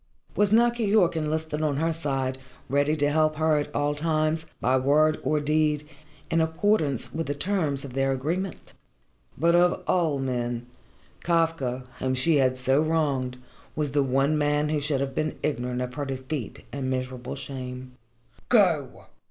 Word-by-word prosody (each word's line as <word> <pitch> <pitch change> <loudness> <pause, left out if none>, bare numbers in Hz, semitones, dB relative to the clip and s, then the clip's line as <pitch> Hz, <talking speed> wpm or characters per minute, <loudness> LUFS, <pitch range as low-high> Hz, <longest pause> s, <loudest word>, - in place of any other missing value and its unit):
Was 205 -1 +2
not 235 +2 +5
Keyork 210 -7 +2
enlisted 155 0 -2
on 150 -3 0
her 165 +2 +1
side, 135 -5 -2 0.3
ready 145 +2 +2
to 145 -1 +1
help 155 0 +2
her 155 0 +2
at 145 - -2
all 145 0 +1
times, 155 +1 0
by 130 - +2
word 150 +4 +3
or 155 - +1
deed, 150 0 +1 0.4
in 165 - +3
accordance 160 - 0
with 165 +1 -3
the 145 - -2
terms 150 -5 0
of 130 - -9
their 135 0 +1
agreement? 165 +8 -3 0.6
But 170 +4 +3
of 175 +1 +3
all 165 -6 +1
men 120 -2 -2 0.6
Kafka, 165 -7 0 0.2
whom 130 0 0
she 150 +5 +3
had 130 -2 +2
so 130 +3 +2
wronged, 145 -6 0 0.4
was 150 -2 -1
the 145 - +2
one 135 +3 +2
man 145 0 +1
who 150 -1 0
should 140 -2 0
have 135 -1 -2
been 155 +2 -2
ignorant 125 -3 -1
of 125 0 -6
her 145 +1 -3
defeat 130 -2 -5
and 135 -2 -3
miserable 130 -1 -4
shame. 130 -1 -7 0.6
"Go!" 170 - +2
145 Hz, 160 wpm, -26 LUFS, 130-160 Hz, 0.6 s, not